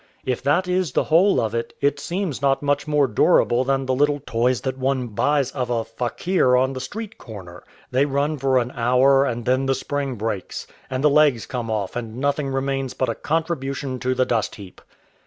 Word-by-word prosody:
If 125 -2 -1
that 175 +6 +1
is 180 -5 0
the - - +2
whole 175 +6 +4
of 110 -1 -1
it, 115 0 -3
it 140 0 +1
seems 175 -3 -3
not 135 0 +1
much 145 +1 0
more 150 -2 +3
durable 120 +1 +3
than 135 0 0
the 130 - 0
little 145 +2 +2
toys 120 0 +1
that 130 +3 -2
one 130 -2 -1
buys 140 +5 +1
of 125 -3 -3
a 115 -2 -1
fakir 125 +4 +1
on 130 +1 +1
the 130 - -5
street 210 - -7
corner. 95 -6 -10 0.3
They 135 +3 +2
run 145 +2 -1
for 135 0 +2
an 125 0 0
hour, 130 +3 +3
and 120 -3 -3
then 130 +2 +1
the 135 - +2
spring 140 -2 -3
breaks, 105 -3 -4 0.2
and 130 +1 -3
the 150 - +6
legs 145 -6 +4
come 120 -3 -4
off, 105 -4 -2
and 115 -1 -5
nothing 140 +1 0
remains 135 -1 -2
but 130 - 0
a - - 0
contribution 140 -5 -2
to 130 +1 -1
the 130 0 +2
dust 115 -4 -1
heap. 95 -3 -12
130 Hz, 205 wpm, -22 LUFS, 120-145 Hz, 0.3 s, the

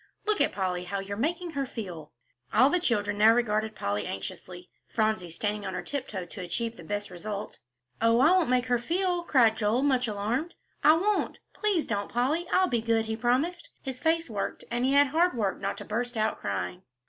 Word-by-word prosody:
Look 425 -1 +1
at - - +3
Polly, 180 -2 -2
how 200 +3 -3
you're 195 +1 -4
making 335 - -1
her 275 -3 -2
feel." 175 -11 -7 0.4
All 270 +2 +5
the 360 - +3
children 205 - 0
now 220 +2 +7
regarded 220 -2 0
Polly 100 +1 -2
anxiously, 175 - -7 0.2
Phronsie 215 -5 0
standing 205 +5 -3
on 190 -2 -4
tiptoe 250 -10 -4
to 185 - -9
achieve 225 +6 -2
the 170 - -11
best 205 +3 -3
result. 200 +3 -6 0.4
"Oh, 230 +1 +4
I 295 +6 +6
won't 365 -7 +3
make 250 0 +2
her 245 -1 +1
feel," 355 +6 0
cried 245 -9 +4
Joel, 220 +5 +1
much 260 -3 +2
alarmed, 220 +10 -2 0.3
"I 305 - +8
won't. 410 +4 0 0.2
Please 405 -7 +1
don't, 205 -2 -2
Polly; 290 +9 0
I'll 370 0 +4
be 240 -8 0
good," 225 0 +1
he 220 0 -2
promised. 270 - 0
His 265 -2 -5
face 330 0 +2
worked, 205 -5 -4
and 240 +1 0
he 270 - +2
had 285 0 +5
hard 335 +3 +2
work 200 -4 -1
not 200 - -2
to - - -8
burst 240 +2 -2
out 215 0 0
crying. 90 -3 -3
230 Hz, 200 wpm, -28 LUFS, 200-285 Hz, 0.4 s, I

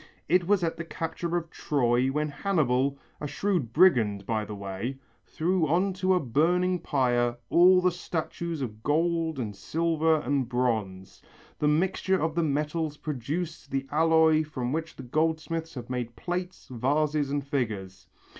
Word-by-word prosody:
It 175 +2 +3
was 200 -2 +3
at 165 - -1
the 170 - -4
capture 165 +1 -3
of 165 -1 -5
Troy, 125 -3 +1
when 150 +3 -1
Hannibal, 140 -5 +1 0.2
a 150 - -4
shrewd 175 - -1
brigand 115 - +4
by 110 -1 -1
the 105 0 -7
way, 100 +6 -5 0.3
threw 170 0 0
on 185 +6 +2
to 185 0 +2
a - - +3
burning 175 +7 +1
pyre 120 -5 +1
all 180 +1 +6
the 180 0 +3
statues 170 -2 -4
of 110 -3 -6
gold 165 +2 +1
and 110 -5 -4
silver 160 - +1
and 135 -3 -1
bronze. 110 -7 -2 0.4
The 150 - +2
mixture 185 +4 +1
of 160 0 0
the 170 - +1
metals 150 0 -1
produced 155 +5 -4
the 135 0 -2
alloy 160 0 +4
from 130 -4 -4
which 165 +1 -3 0.2
goldsmiths 160 +1 -1
have 120 -2 -6
made 125 -2 -4
plates, 180 +1 -4
vases 145 +4 +1
and 140 -1 -2
figures. 105 - -3
150 Hz, 155 wpm, -27 LUFS, 125-170 Hz, 0.4 s, all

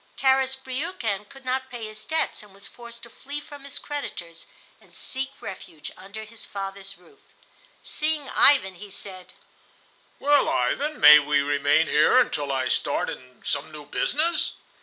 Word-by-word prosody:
Tarras 265 +1 +3
Briukhan 255 - -4
could 270 -1 -15
not 260 +1 -1
pay 240 -3 -6
his 215 0 -9
debts, 320 0 -1
and 205 -2 -17
was 200 - -11
forced 235 -1 -11
to 235 - -8
flee 280 +4 -7
from 290 -1 -12
his 280 - -4
creditors 175 - -6 0.3
and - - -22
seek 265 +1 -4
refuge 165 -5 -8
under 200 +3 -8
his 220 +1 -9
father's 195 -1 -6
roof. 180 - -22 0.6
Seeing 305 -2 0
Ivan, 265 -10 +6
he 205 +3 -11
said: 185 -1 -8 0.8
"Well, 290 +1 +3
Ivan, 300 +2 0
may 150 0 +10
we 145 0 +2
remain 145 +2 +3
here 155 +11 +4
until 145 - +2
I 130 -1 0
start - - 0
in 125 0 -12
some 140 +2 -1
new 150 -1 -10
business?" 325 - +1
220 Hz, 160 wpm, -25 LUFS, 175-270 Hz, 0.8 s, may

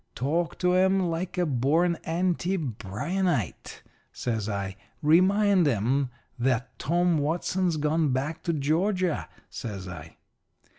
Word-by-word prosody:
Talk 160 +7 -1
to 180 0 +2
'em 190 +1 +4
like 175 +3 -3
a 180 - +2
born 155 +6 +2
anti 180 +2 0
Bryanite,' 125 - -2 0.3
says 110 -3 -2
I. 100 -2 -3 0.3
'Remind 185 +3 +4
'em 130 +3 +1 0.3
that 125 0 -1
Tom 170 +2 +2
Watson's 170 +3 0
gone 150 0 +1
back 140 +5 -2
to 170 - +1
Georgia,' 170 +4 0 0.2
says 100 -5 -6
I. 80 -3 -9
160 Hz, 115 wpm, -27 LUFS, 125-180 Hz, 0.3 s, em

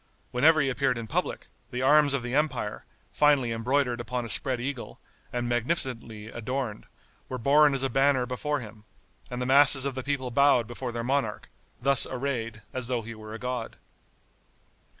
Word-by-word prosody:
Whenever 155 +6 +4
he 140 - +1
appeared 130 -1 0
in 115 - -5
public, 110 - -3 0.2
the 125 +1 -3
arms 145 0 +5
of 130 - -3
the 120 0 -5
empire, 135 -8 -1 0.3
finely 145 -5 +3
embroidered 120 +1 0
upon 120 +1 -4
a - - -7
spread 130 +2 0
eagle, 130 0 -6 0.3
and 120 -1 -2
magnificently 120 -3 -2
adorned, 120 0 -5 0.4
were 130 - -4
borne 145 +3 +4
as 135 - +1
a - - +2
banner 135 -2 +2
before 140 +3 -3
him; 105 -2 -12 0.5
and 125 - -5
the 125 - -2
masses 135 0 +7
of 140 - -1
the 130 - -4
people 130 -2 -3
bowed 140 -2 +4
before 120 +2 -6
their 115 0 -4
monarch, 130 -4 -2 0.3
thus 135 +2 +4
arrayed, 120 -4 -4
as 125 -2 -1
though 120 -2 -1
he 115 +1 -8
were 110 0 -9
a - - -5
god. 125 -1 -5
125 Hz, 175 wpm, -27 LUFS, 120-140 Hz, 0.5 s, masses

